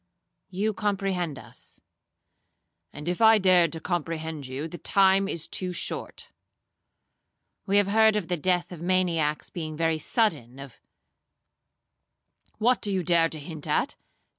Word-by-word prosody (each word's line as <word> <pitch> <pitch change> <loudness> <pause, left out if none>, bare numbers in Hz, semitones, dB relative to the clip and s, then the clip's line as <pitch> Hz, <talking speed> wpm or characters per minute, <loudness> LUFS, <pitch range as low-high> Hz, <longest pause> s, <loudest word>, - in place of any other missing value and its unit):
'—'You 205 +3 -1
comprehend 190 -7 -2
us.'—'And 150 +3 -15
if 175 +4 -2
I 220 0 +7
dared 180 -4 +4
to 160 - -5
comprehend 160 -4 -4
you, 135 +4 -5
the 175 +1 -9
time 195 -1 +3
is 165 -5 -4
too 185 -1 -3
short,'—'We 195 +3 -7
have 205 -1 +3
heard 220 +1 +4
of 205 -5 -2
the 180 - 0
death 180 +2 0
of 170 -3 -9
maniacs 170 -4 0
being 155 -3 -5
very 165 -1 +1
sudden, 150 - 0
of—' 135 -3 -11 1.8
'What 240 +3 +2
do 205 - -2
you 190 -2 0
dare 170 -1 +3
to 160 - -7
hint 155 0 -8
at?' - - 0
175 Hz, 135 wpm, -26 LUFS, 160-195 Hz, 1.8 s, I